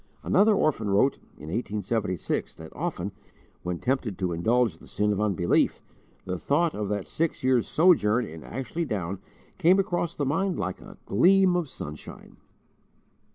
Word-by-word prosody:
Another 210 +1 +4
orphan 135 - +1
wrote, 105 +8 +3 0.2
in 75 +3 -9
1876, 105 -2 -2
that 80 -1 -11
often, 145 - -3 0.5
when 90 0 -3
tempted 125 -3 -1
to 90 -2 -1
indulge 110 +1 +1
the - - -15
sin 105 0 0
of 105 - -2
unbelief, 95 -5 +2 0.5
the 90 -1 -3
thought 160 +3 +1
of 105 -1 -3
that 105 -2 -2
six 165 -4 -2
years' 130 -3 +3
sojourn 125 - +4
in 80 -1 -10
Ashley 135 +7 -4
Down 95 - -3 0.4
came 180 +4 +5
across 175 -4 -1
the 145 - -1
mind 180 +7 0
like 95 0 -3
a - - -12
gleam 185 - +4
of 175 -5 -1
sunshine. 75 - -8
115 Hz, 155 wpm, -26 LUFS, -, 0.5 s, came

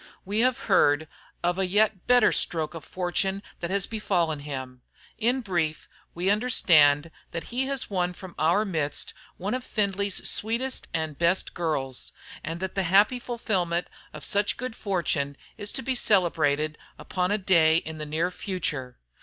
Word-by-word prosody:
We 205 +3 -1
have 255 +2 +2
heard 145 +2 +3 0.4
of 175 +2 +1
a 190 - +1
yet 205 0 +2
better 245 0 +6
stroke 160 -2 +1
of 165 -3 -8
fortune 190 +3 -1 0.2
that 170 - -3
has 195 0 +2
befallen 175 -8 0
him. 130 -3 -6 0.4
In 245 +3 +2
brief, 170 -8 -2 0.3
we 180 +3 +1
understand 165 -9 +4 0.3
he 255 +2 -2
has 275 -1 -1
won 180 -3 -1
from 185 -1 -10
our 170 +8 +3
midst 155 -7 -1 0.2
one 195 +5 -3
of 255 0 -2
Findlay's 200 -3 0
sweetest 235 +5 -1
and 160 -3 -3
best 170 +2 +1
girls, 140 -6 -2 0.3
and 165 +3 -4
that 190 - -3
the 195 - 0
happy 210 +7 +5
fulfilment 190 -8 -1 0.2
of - - -9
such 205 0 +2
good 250 -2 -5
fortune 160 -8 -1 0.2
is 205 0 -4
to 265 - -3
be 260 +1 0
celebrated 155 - +2 0.2
upon 180 -1 -2
a 205 - +2
day 165 -5 +4
in 160 -1 -5
the 150 - -3
near 165 +4 0
future. 150 -10 -3
180 Hz, 160 wpm, -26 LUFS, 160-210 Hz, 0.4 s, better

